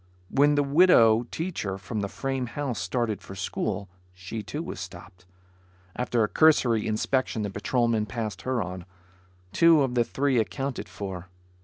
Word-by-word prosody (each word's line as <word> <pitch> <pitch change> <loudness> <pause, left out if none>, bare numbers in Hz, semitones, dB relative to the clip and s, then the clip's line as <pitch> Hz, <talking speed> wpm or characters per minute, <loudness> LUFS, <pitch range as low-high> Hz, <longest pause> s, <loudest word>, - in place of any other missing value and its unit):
When 145 +2 +4
the 145 - +3
widow 140 -7 +5
teacher 160 - -3
from 100 +3 -5
the 100 - -1
frame 135 +3 -3
house, 125 0 -3
started 110 +3 -2
for 95 - -10
school, 95 +1 -3 0.3
she 90 +5 -6
too, 145 +10 -5
was - - -6
stopped. 90 +1 -10 0.7
After 120 -2 0
a - - +2
cursory 125 -7 +3
inspection 110 +1 0
the 100 - -3
patrolman 115 +1 0
passed 105 -3 -4
her 125 +1 -1
on. 90 0 -7 0.7
Two 165 -3 +6
of 130 -2 -1
the 120 -1 +3
three 135 +1 0
accounted 135 +4 -3
for. 95 -3 -7
115 Hz, 155 wpm, -26 LUFS, 100-135 Hz, 0.7 s, Two